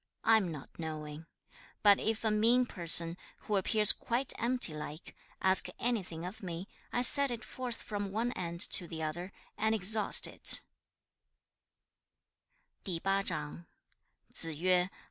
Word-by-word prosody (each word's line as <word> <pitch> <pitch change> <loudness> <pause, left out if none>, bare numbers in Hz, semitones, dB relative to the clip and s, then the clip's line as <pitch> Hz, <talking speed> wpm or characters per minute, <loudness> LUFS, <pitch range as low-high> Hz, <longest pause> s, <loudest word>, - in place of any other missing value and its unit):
I 225 0 +4
am 190 -6 -3
not 150 +1 -12
knowing. 155 -1 -8 0.6
But 205 -1 +5
if 220 0 -3
a 220 - 0
mean 230 +4 +2
person, 170 -4 +3 0.2
who 210 - -4
appears 210 +2 +6
quite 250 +3 -2
empty 245 -7 +1
like, 150 +1 -10 0.3
ask 190 0 +5
anything 185 -9 -4
of 185 +4 -10
me, 175 0 -7 0.2
I 245 - -2
set 280 +2 0
it 235 -3 -6
forth 245 0 -5
from 205 -3 -6
one 230 +4 -3
end 170 -5 -4
to 175 - +4
the 160 -1 -7
other, 175 +5 -6 0.3
and 220 +1 0
exhaust 210 +1 +4
it.' - - +5
200 Hz, 125 wpm, -30 LUFS, 170-225 Hz, 0.6 s, appears